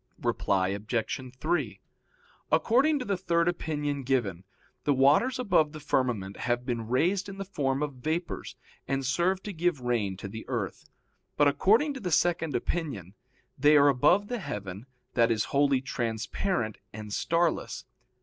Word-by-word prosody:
Reply 95 -1 +1
Obj. 105 +5 -2 0.2
3: 140 - -1 0.7
According 255 - +3
to 255 - -4
the 200 - 0
third 170 -2 +1
opinion 150 -4 -2
given, 120 -9 -1 0.4
the 145 +1 +2
waters 145 - +4
above 165 -11 +2
the 155 - -7
firmament 120 -9 -1
have 120 0 -1
been 115 -3 -3
raised 180 - +1
in 195 - -8
the 195 - -4
form 140 -7 -1
of 145 -2 -3
vapors, 165 +5 -3 0.3
and 135 0 -1
serve 175 +8 +1
to 205 - -5
give 170 -4 0
rain 115 -6 -1
to 100 - -6
the 110 +3 -7
earth. 115 -7 -4 0.5
But 145 - +5
according 215 - +3
to 270 - -7
the 190 -6 -3
second 165 -3 +1
opinion, 120 - -3 0.5
they 150 +2 +6
are 145 0 +6
above 150 +10 +3
the 245 +1 -3
heaven 100 - -6 0.3
that 115 -1 +3
is 110 -2 +1
wholly 140 -2 +3
transparent 115 - -2
and 105 -1 -7
starless. 170 +5 0
140 Hz, 155 wpm, -28 LUFS, 115-175 Hz, 0.7 s, they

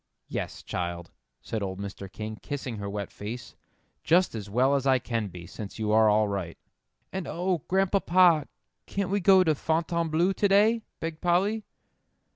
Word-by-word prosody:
"Yes, - - -4
child," 85 -1 -4 0.3
said 110 - -3
old 95 -1 -4
Mr. 100 -1 -7
King, 110 +1 -6
kissing 130 -5 -5
her 100 -1 -4
wet 100 0 -4
face; 115 +4 -7 0.5
"just 175 +4 +3
as 105 -3 -6
well 130 +6 +3
as 140 -1 +1
I 130 -1 +5
can 115 -3 -2
be, 90 -2 -10
since 100 +3 -8
you 110 -1 -1
are 110 0 +5
all 105 0 +3
right." 95 -4 -4 0.6
"And, 190 -2 -3
oh, 180 0 -1
Grandpapa, 185 -4 +4 0.4
can't 195 -2 -2
we 200 - +2
go 190 0 +6
to 160 -3 +3
Fontainebleau 165 +3 0
to 205 - +2
day?" 215 +4 +4 0.2
begged 165 -1 -5
Polly. 195 +5 +1
140 Hz, 165 wpm, -27 LUFS, -, 0.6 s, go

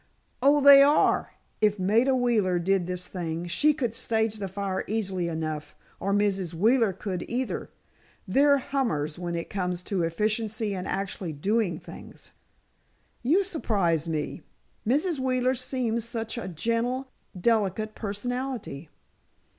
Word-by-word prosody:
"Oh, 285 +2 +5
they 280 0 +10
are! 290 +2 +3 0.3
If 210 -1 +3
Maida 225 +8 +3
Wheeler 225 -8 +2
did 180 +1 +1
this 180 0 -4
thing, 170 -2 -4
she 290 - +3
could 260 -7 -2
stage 220 -2 0
the 200 -2 -4
fire 190 0 -3
easily 195 -5 -1
enough. 155 -2 -4 0.2
Or 195 - -1
Mrs. 195 -4 0
Wheeler 225 +4 +3
could, 185 -1 -4
either. 250 +2 -2 0.6
They're 280 +8 +4
hummers 225 - -2
when 175 -1 -3
it 170 - -5
comes 180 -2 -2
to 190 -1 -1
efficiency 215 +5 -1
and 185 -1 -4
actually 195 -3 -3
doing 190 +2 0
things!" - - -12 0.9
"You 325 +11 +3
surprise 195 - 0
me. 155 -2 -3 0.5
Mrs. 295 - +1
Wheeler 255 -1 +1
seems 245 -3 -1
such 225 -1 -4
a 235 - -5
gentle, 230 - -1 0.3
delicate 215 0 +1
personality." 220 - -4
210 Hz, 130 wpm, -27 LUFS, 180-245 Hz, 0.9 s, they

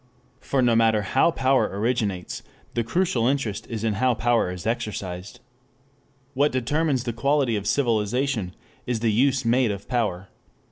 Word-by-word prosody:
For 135 -2 0
no 120 -2 +3
matter 110 -2 +3
how 130 +10 +3
power 135 -4 +2
originates, 100 -3 -2 0.3
the 120 - 0
crucial 125 -3 +1
interest 130 -7 -1
is 115 -2 -4
in 110 -2 +1
how 130 -2 +3
power 120 -3 +1
is 90 0 -7
exercised. 105 -2 -4 0.9
What 145 +3 +2
determines 135 +1 0
the 120 -2 -3
quality 140 0 +1
of 105 -1 -3
civilization 115 -3 0 0.3
is 120 -3 -1
the 115 -2 +2
use 130 +3 +2
made 120 +1 +3
of 100 -1 -5
power. 105 -7 -1
120 Hz, 150 wpm, -24 LUFS, 105-130 Hz, 0.9 s, no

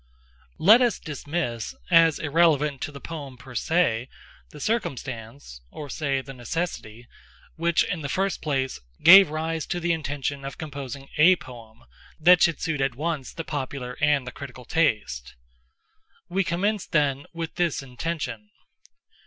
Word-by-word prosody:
Let 215 +9 +7
us 245 -2 +2
dismiss, 145 -6 -4 0.2
as 165 -2 +6
irrelevant 150 -3 +2
to - - -3
the 140 - -10
poem, 140 -5 -8
per 130 0 -12
se, 125 -4 +1 0.4
the 150 - -12
circumstance—or 120 - -5
say 140 -4 -1
the 135 +1 -10
necessity—which, 135 +4 -3
in 180 -4 -3
the 140 - -4
first 195 +4 -1
place, 135 -4 -1 0.2
gave 190 0 +10
rise 160 +1 -3
to 175 - -2
the 175 0 +1
intention 145 -2 -3
of 135 - -6
composing 140 -3 -7
a 175 +4 +8
poem 115 - -13 0.4
that 175 +2 +6
should 170 -3 +3
suit 160 -5 -2
at 135 -2 0
once 155 -1 -3
the 165 - -6
popular 130 -3 -4
and 150 -3 +3
the - - -6
critical 130 -3 -10
taste. 105 - 0 0.9
We 190 +2 +1
commence, 190 +4 -1
then, 145 -3 +1
with 165 -1 -5
this 170 -6 0
intention. 125 -5 -5
145 Hz, 140 wpm, -25 LUFS, 130-165 Hz, 0.9 s, gave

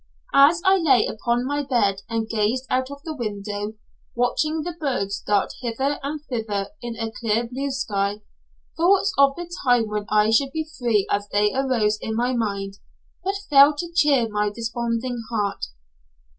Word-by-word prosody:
As 295 +5 +6
I 380 0 +6
lay 270 -9 +4
upon 240 +3 -1
my 290 +2 -1
bed 220 -8 +1
and 225 -1 -1
gazed 225 +4 0
out 255 +1 +1
of 280 0 -10
the 320 -2 -5
window, 205 -3 -4 0.4
watching 305 +6 0
the 350 - -3
birds 245 -10 -2
dart 205 -1 0
hither 265 +4 -1
and 290 +2 -4
thither 220 -4 -3
in 240 -1 -5
a 225 -1 -4
clear 225 +1 -1
blue 270 +4 -3
sky, 205 -6 -2 0.5
thoughts 390 +4 +3
of 275 0 +5
the 350 0 -6 0.2
time 245 -4 +3
when 210 -1 -3
I 215 +1 +3
should 270 +4 +2
be 315 -1 -3
free 230 -5 +2
as 205 0 -1
they 205 0 +2
arose 235 -6 +1
in 220 - -3
my 245 +2 +1
mind, 200 -4 -3 0.4
but 390 +2 -1
failed 285 +1 +6
to 340 +1 -5
cheer 280 -8 +4
my 210 -1 0
desponding 235 +2 -3
heart. 205 - -1
240 Hz, 170 wpm, -23 LUFS, 210-280 Hz, 0.5 s, As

